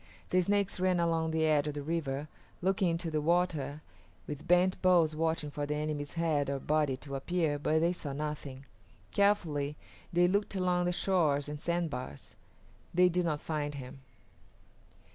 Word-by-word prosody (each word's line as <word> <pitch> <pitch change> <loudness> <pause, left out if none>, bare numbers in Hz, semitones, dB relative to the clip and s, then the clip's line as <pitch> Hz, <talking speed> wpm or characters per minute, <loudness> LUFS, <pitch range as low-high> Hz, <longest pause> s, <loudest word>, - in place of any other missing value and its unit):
The 185 - +3
Snakes 200 +1 +1
ran 185 -1 +2
along 165 -1 +1
the 160 0 +1
edge 150 -1 +3
of 150 - -3
the 145 - -4
river, 150 -2 -2 0.3
looking 190 +1 +1
into 165 0 -2
the 155 -1 0
water, 155 -3 0 0.4
with 150 -1 -7
bent 180 +1 +3
bows 170 -4 +4
watching 160 -2 -1
for 145 0 -3
the 150 - -1
enemy's 150 -1 -3
head 155 -4 0
or 140 - -1
body 150 -1 +1
to 140 +1 -10
appear, 150 +1 0
but 155 +2 +2
they 170 +2 +2
saw 150 -5 -5
nothing. 140 -2 -5 0.5
Carefully 160 -8 +1 0.4
they 175 +1 +4
looked 200 +2 0
along 180 -1 +1
the 180 - +1
shores 160 -6 +1
and 150 0 -6
sandbars; 165 - -3 0.6
they 180 +1 +5
did 180 0 0
not 150 -3 -1
find 145 -2 -3
him. 135 -1 -8
160 Hz, 165 wpm, -31 LUFS, 145-175 Hz, 0.6 s, they